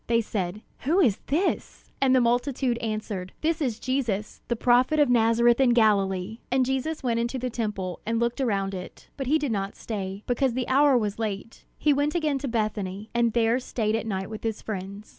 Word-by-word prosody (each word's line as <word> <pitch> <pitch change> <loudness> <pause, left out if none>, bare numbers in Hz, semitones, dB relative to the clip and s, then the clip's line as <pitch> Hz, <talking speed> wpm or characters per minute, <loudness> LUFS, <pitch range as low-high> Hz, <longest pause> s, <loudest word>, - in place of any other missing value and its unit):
They 230 0 +3
said: 205 -2 -3 0.2
"Who 325 +8 +1
is 235 - +3
this?" 330 +8 -1
And 260 -1 +4
the 255 - +5
multitude 245 0 +1
answered: 215 -4 -4
"This 320 +1 0
is 245 -6 -1
Jesus, 235 -6 -2
the 240 - 0
prophet 250 +6 +3
of 290 -4 +4
Nazareth 235 +1 +4
in 250 -3 +4
Galilee!" 200 -2 +2
And 260 0 +3
Jesus 265 +5 -2
went 235 -2 +1
into 235 +3 -1
the 250 0 -3
Temple, 205 -6 -3
and 230 +1 -1
looked 235 +3 0
around 200 -6 0
it; 180 -1 -8
but 270 -2 -4
he 305 +4 +4
did 290 -5 -2
not 195 -2 -2
stay, 195 -2 -5
because 250 0 +1
the 255 -1 -1
hour 275 0 +5
was 210 -2 -2
late. 215 0 -4
He 300 - +3
went 290 +3 0
again 305 -5 +1
to 275 - -4
Bethany, 215 -3 -2
and 235 -1 +2
there 235 +1 +3
stayed 220 -4 -1
at 225 0 -2
night 190 -1 -3
with 215 - -7
his 225 -2 -2
friends. 200 0 -6
235 Hz, 200 wpm, -26 LUFS, 210-260 Hz, 0.2 s, the